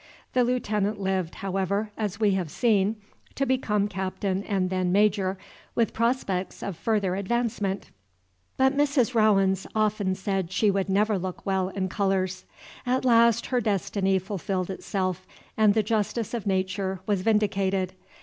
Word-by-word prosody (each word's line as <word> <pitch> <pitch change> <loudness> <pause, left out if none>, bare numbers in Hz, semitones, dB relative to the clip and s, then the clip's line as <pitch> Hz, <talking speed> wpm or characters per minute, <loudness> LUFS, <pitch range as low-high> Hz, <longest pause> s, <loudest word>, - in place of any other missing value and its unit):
The 250 - +4
Lieutenant 215 -4 0
lived, 190 -3 -1
however, 195 +2 -1
as 210 -1 -3
we 210 -2 +3
have 185 -4 -1
seen, 210 +2 +2 0.4
to 275 - 0
become 215 -6 +1
Captain 190 0 -2
and 190 -3 0
then 185 -1 0
Major, 195 -1 +2 0.4
with 230 -2 +1
prospects 225 -6 -1
of 200 - -4
further 200 0 0
advancement. 205 -1 -2 0.7
But 265 +1 +3
Mrs. 275 -4 +2
Rowens 195 -4 +3
often 210 -3 +1
said 190 -2 -2
she 205 +2 +3
should 195 0 -1
never 205 +1 +2
look 185 0 -6
well 190 -1 0
in 190 -1 -2
colors. 190 -1 -1 0.4
At 255 +1 0
last 235 -1 +5
her 250 -2 0
destiny 195 -2 +1
fulfilled 190 -1 -3
itself, 185 -2 -3 0.3
and 215 -1 +4
the 220 - +3
justice 220 +1 -1
of 230 -4 -3
Nature 190 0 -1
was 205 -3 0
vindicated. 195 -3 +1
200 Hz, 145 wpm, -26 LUFS, 190-220 Hz, 0.7 s, last